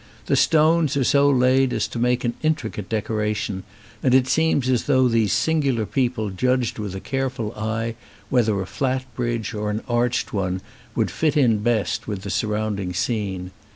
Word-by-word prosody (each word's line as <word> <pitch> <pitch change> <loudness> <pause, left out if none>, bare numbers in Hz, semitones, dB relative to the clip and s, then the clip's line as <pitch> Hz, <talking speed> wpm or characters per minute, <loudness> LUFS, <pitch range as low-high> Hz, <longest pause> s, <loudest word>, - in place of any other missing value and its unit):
The - - +2
stones 155 -2 +3
are 135 - +2
so 140 +3 +4
laid 130 0 +3
as - - 0
to 120 - -5
make 125 +1 +1
an 120 - 0
intricate 135 -11 -2
decora 105 -1 -1
tion, 95 -2 -3 0.4
and 130 -1 +3
it 130 -1 +4
seems 160 -3 +2
as 125 -2 +1
though 130 -3 +4
these 115 -3 +2
singular 140 -8 +1
people 120 -4 -1
judged 125 +4 0
with 100 -3 -4
a - - -4
careful 130 -3 -3
eye 110 +2 -2 0.4
whether 110 -6 +2
a 95 - -2
flat 130 +5 -2
bridge 120 -3 -2
or 105 -1 -2
an 105 +1 -3
arched 120 0 0
one 95 -2 -1 0.3
would 115 - 0
fit 155 -2 0
in 120 -7 +4
best 110 -1 0
with 100 -3 -4
the 100 - -4
surround 105 0 -1
ing 90 -2 -3
scene. 95 -3 -2
120 Hz, 185 wpm, -23 LUFS, 105-130 Hz, 0.4 s, so